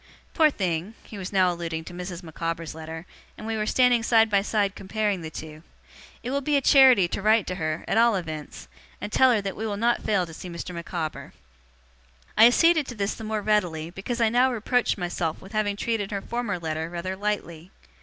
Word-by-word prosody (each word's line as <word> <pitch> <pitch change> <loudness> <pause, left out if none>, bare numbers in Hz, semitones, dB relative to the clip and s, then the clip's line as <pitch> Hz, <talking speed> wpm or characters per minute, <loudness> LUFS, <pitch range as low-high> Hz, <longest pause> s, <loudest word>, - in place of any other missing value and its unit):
Poor 315 -2 +5
thing!' 185 - -3
he - - -11
was 185 - -6
now 185 -2 +3
alluding 165 -2 -4
to 175 - -10
Mrs. 180 0 -7
Micawber's 165 0 -4
letter, 160 +1 -8 0.3
and 215 - -9
we 225 0 -2
were 215 -1 -2
standing 250 -1 +4
side 225 -1 +3
by 200 -1 +4
side 200 -1 0
comparing 205 -1 -2
the 160 - -6
two; 155 0 -9 0.6
'it 245 - -4
will 280 +1 0
be 290 +1 +1
a - - +4
charity 260 -8 +6
to 185 - -4
write 215 0 +3
to - - -3
her, 155 0 -2
at 220 - +2
all 235 -2 +4
events, 155 - -6 0.3
and 205 - -6
tell 260 +3 +5
her 220 -4 +2
that 195 -1 -4
we 220 - -4
will 205 -1 -3
not 235 +3 +1
fail 195 -4 +1
to 165 - -11
see 180 - -8
Mr. 170 +1 -6
Micawber.' 165 -5 -5 1.0
I 225 - +8
acceded 320 +3 +4
to 245 - -7
this 200 -1 -1
the 225 - -9
more 215 -1 -3
readily, 175 -7 0
because 200 +7 -5
I 230 -1 +3
now 250 +3 +3
reproached 245 +1 0
myself 175 -3 -3
with 190 - -13
having 215 -2 0
treated 205 -1 -2
her 200 -2 -4
former 235 -5 -3
letter 160 -1 -3
rather 175 +2 -4
lightly. 190 -5 -4
200 Hz, 215 wpm, -25 LUFS, 170-225 Hz, 1.0 s, I